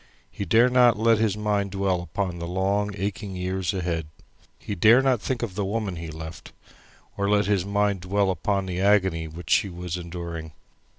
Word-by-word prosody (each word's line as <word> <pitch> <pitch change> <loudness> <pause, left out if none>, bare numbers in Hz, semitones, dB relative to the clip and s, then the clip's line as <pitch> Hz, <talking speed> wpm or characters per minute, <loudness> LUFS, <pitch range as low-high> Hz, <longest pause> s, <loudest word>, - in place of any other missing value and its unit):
He 100 - -5
dare 115 +7 +5
not 125 -2 +5
let 115 0 +3
his 110 -2 +1
mind 105 -1 0
dwell 95 -2 0
upon 90 0 -3
the 85 - -4
long 100 +3 0
aching 100 0 -4
years 90 0 -2
ahead. 85 -4 -2 0.5
He - - -6
dare 110 +7 +6
not 130 -5 +2
think 125 -3 -2
of 110 -6 -3
the 100 +2 -2
woman 100 -2 -2
he 85 0 -6
left, 80 0 -9 0.6
or 100 0 0
let 105 0 +3
his 100 -2 +1
mind 100 -1 0
dwell 95 +1 +1
upon 100 +1 -1
the 90 -1 -4
agony 95 -5 +2
which 80 +1 -8
she 100 - +3
was 90 0 -5
enduring. 85 -2 -6
95 Hz, 185 wpm, -25 LUFS, 90-105 Hz, 0.6 s, dare